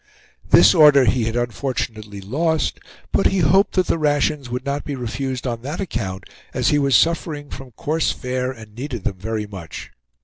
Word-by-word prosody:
This - - +7
order 150 -5 +7
he 120 +1 +2
had 115 +1 -2
unfortunately 115 -4 -3
lost, 155 - -1 0.3
but 195 - +3
he 195 - 0
hoped 185 +4 +3
that 185 -1 +3
the 165 - 0
rations 145 -2 0
would 125 +2 -4
not 140 +1 -2
be 145 - -4
refused 130 +1 -4
on 120 -2 -3
that 145 +7 -5
account, 100 - -4 0.3
as - - +2
he 145 - +3
was 140 -3 +3
suffering 155 -2 +1
from 135 -1 -8
coarse 155 +7 0
fare 125 0 -3
and 110 -4 -12
needed 120 -3 -6
them 95 - -3
very 110 +1 -3
much. 95 -7 -9
130 Hz, 180 wpm, -21 LUFS, 115-150 Hz, 0.3 s, This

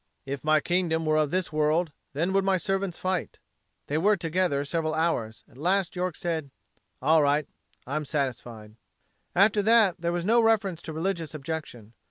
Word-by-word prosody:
"If 135 0 -5
my 155 0 +4
kingdom 170 -2 0
were 155 0 +2
of 155 -2 +2
this 180 -1 -2
world, 155 +2 +1 0.2
then 170 +7 0
would 195 0 +3
my 195 -1 +2
servants 195 0 -2
fight." 185 -1 -2 0.5
They 150 +2 -1
were 205 +4 +3
together 165 -4 0
several 155 +1 -1
hours. 125 -9 -1
At 125 - -19
last 185 +3 +1
York 180 -2 -2
said: 160 -4 -3 0.5
"All 155 +3 +5
right; 145 0 +2 0.4
I'm 150 +3 -3
satisfied." 120 -7 -4 0.6
After 205 +3 +4
that 210 -5 +4
there 170 0 0
was 175 0 -2
no 230 +3 +4
reference 200 -6 +1
to 160 - -7
religious 165 -1 -3
objection. 140 -7 -6
165 Hz, 170 wpm, -27 LUFS, 150-185 Hz, 0.6 s, All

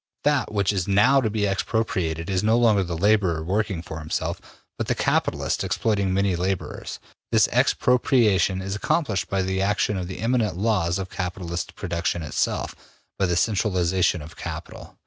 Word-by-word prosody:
That 145 -3 +1
which 100 -1 +1
is 95 -3 -1
now 125 +8 +4
to 110 - 0
be 105 -1 0
expropriated 95 -5 -1
is 95 -2 0
no 110 +2 +3
longer 110 -4 +4
the 85 -3 -3
laborer 95 -4 +2
working 95 -1 -1
for 80 -2 -7
himself, 75 0 -3 0.3
but - - -4
the - - +1
capitalist - - 0
exploiting 100 -4 0
many 95 -1 +1
laborers. 90 +1 -3 0.3
This - - +5
expropriation 110 -7 +2
is 95 +1 -3
accomplished 105 - 0
by 95 -1 0
the 95 0 -1
action 105 +1 +1
of 90 -1 -3
the 95 - -6
immanent 115 -6 0
laws 95 -5 +1
of 95 -1 -5
capitalistic 90 -2 -4
production 85 0 -2
itself, 75 - -1 0.5
by 95 - +2
the 90 - 0
centralization 95 -5 +1
of 75 - -11
capital. - - -8
95 Hz, 165 wpm, -24 LUFS, 90-105 Hz, 0.5 s, This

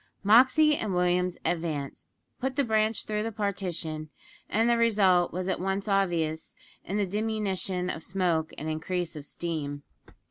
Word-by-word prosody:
Moxey 260 +9 +6
and 210 -8 -2
Williams 180 0 +1
advanced, 160 -5 -2 0.3
put 260 0 -2
the 280 - +2
branch 220 -2 +1
through 210 0 -1
the 225 +1 -2
partition, 180 -7 -3 0.4
and 225 +2 +2
the 240 - +4
result 200 -6 +3
was 185 +1 -3
at 190 - -1
once 195 +2 -2
obvious 170 -6 0 0.3
in 195 - -3
the 205 - +2
diminution 195 -3 -1
of 165 - -4
smoke 175 -3 0
and 155 - -5
increase 170 +2 -2
of 150 -2 -7
steam. 145 -4 -4
185 Hz, 150 wpm, -28 LUFS, 170-215 Hz, 0.4 s, Moxey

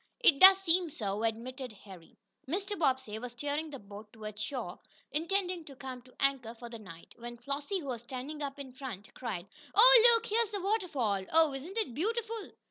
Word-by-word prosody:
"It 335 - +5
does 380 0 +11
seem 355 -2 +1
so," 210 -6 -3
admitted 245 +3 -3
Harry. 190 -4 -14 0.3
Mr. 395 +7 -2
Bobbsey 260 - 0
was 245 +1 -7
steering 290 +5 -3
the 285 - -7
boat 205 -1 -12
toward 215 -1 -8
shore, 215 -5 -4 0.3
intending 355 +3 -1
to 275 - -11
come 260 -1 -7
to 255 +1 -20
anchor 265 -4 0
for 235 +1 -9
the 230 -1 -8
night, 170 -6 -12
when 240 0 -8
Flossie, 285 - -3
who - - -9
was 240 -3 -3
standing 265 +5 -6
up 280 -1 -4
in 270 -3 -9
front 245 -6 -8
cried: 210 -8 -5 0.3
"Oh, - - +9
look! 460 -1 +2
Here's 455 0 +1
the 410 -1 -3
waterfall! 290 - 0
Oh, 320 -3 +4
isn't 315 +10 -7
it 430 - -1
beautiful!" 450 - -2
270 Hz, 190 wpm, -31 LUFS, 230-360 Hz, 0.3 s, does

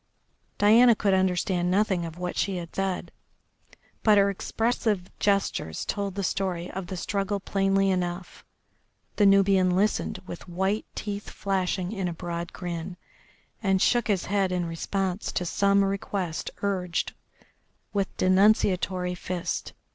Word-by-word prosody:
Diana 230 +3 +6
could 200 -2 +1
understand 180 -1 +1
nothing 190 -2 +1
of 165 +1 -10
what 180 0 -4
she 195 -2 0 0.2
said, 195 -1 -2 0.9
but 215 -2 +5
her 200 0 +4
expressive 220 -2 -1
gestures 195 - 0
told 200 -2 -2
the 200 - -2
story 180 -2 -2
of 190 -1 -5
the 185 - -5
struggle 200 +2 -1
plainly 195 0 +1
enough. 180 0 -3 0.7
The 205 - +5
Nubian 195 -2 +4
listened 205 +3 0
with 175 +1 -9
white 190 +4 -1
teeth 205 -1 -5
flashing 190 -1 -1
in 195 -4 -2
a 175 - -3
broad 170 0 -5
grin, 175 0 -5 0.6
and 195 -3 +2
shook 240 +3 +2
his 200 -4 +1
head 195 -1 +1
in 180 -1 0
response 185 +3 -2
to 180 - -1
some 200 +3 +3
request 195 -3 -3
urged 180 -4 -1 0.8
with 200 -2 -2
denunciatory 185 -2 +3
fist. 180 -1 -4
190 Hz, 130 wpm, -26 LUFS, 180-200 Hz, 0.9 s, Diana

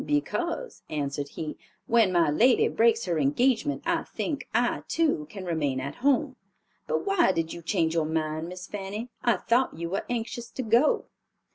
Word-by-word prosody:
"Because," 340 +9 -2
answered 145 -1 -2
he, 155 -2 -4 0.3
"when 225 -5 +4
my 170 -4 +3
lady 240 - +4
breaks 230 0 +3
her 170 -3 0
engagement, 240 - +1
I - - +1
think 295 -3 -4
I, 240 +1 +1
too, 300 - +1
can 195 -3 -8
remain 150 -6 0
at 140 +2 -5
home. 275 -1 +2 0.5
But - - -1
why 390 - +4
did 165 -1 -2
you 170 - -8
change 165 -2 0
your 160 -2 +1
mind, 155 +1 -2
Miss 180 0 -7
Fanny? 205 +4 -5
I 240 -2 +3
thought 245 -5 +1
you 170 +1 -4
were 195 - -2
anxious 235 0 -3
to 260 - -3
go." 235 +6 +3
200 Hz, 170 wpm, -27 LUFS, 160-245 Hz, 0.5 s, when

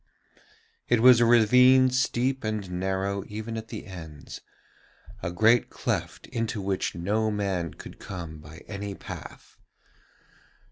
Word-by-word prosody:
It 120 - +4
was 125 0 +7
a 120 - +5
ravine 125 +3 +6
steep 130 +1 0
and 105 -4 -3
narrow 95 +2 -2
even 110 +2 -6
at 110 0 -6
the - - -7
ends, 80 -7 -10 0.8
a 85 - -3
great 110 +6 +3
cleft - - -3
into 115 -2 -2
which 95 -1 -2
no 105 +6 0
man 95 -6 -2
could - - -11
come 85 -5 -7
by 75 +2 -13
any 100 -1 -5
path. - - -10
105 Hz, 130 wpm, -26 LUFS, 95-115 Hz, 0.8 s, was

